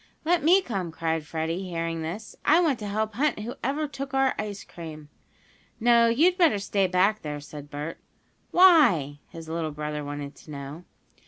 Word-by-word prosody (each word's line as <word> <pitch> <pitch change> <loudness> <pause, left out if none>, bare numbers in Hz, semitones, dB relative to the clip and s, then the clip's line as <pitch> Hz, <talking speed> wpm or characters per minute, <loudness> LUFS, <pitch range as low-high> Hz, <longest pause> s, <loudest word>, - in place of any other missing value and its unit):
"Let 345 +1 +2
me 365 +5 +5
come!" 190 - -3
cried 160 -1 -2
Freddie, 165 +3 -2
hearing 165 -1 -3
this. 180 +7 -6
"I 320 +3 +5
want 310 -8 +2
to 210 - -5
help 215 +1 -2
hunt 280 -2 0
whoever 270 +6 -3
took 275 -1 -6
our 270 0 +3
ice 205 -1 -4
cream." 155 -3 -10 0.7
"No, 235 0 +5
you'd 335 +11 +3
better 325 - +5
stay 200 -1 0
back 190 +4 +2
there," 150 -1 -5
said 145 0 -10
Bert. 150 +2 -6 0.5
"Why?" 245 - +5
his 165 -2 -10
little 160 0 -2
brother 150 0 -4
wanted 145 0 -6
to - - -16
know. 145 +4 -8
185 Hz, 170 wpm, -26 LUFS, 155-260 Hz, 0.7 s, me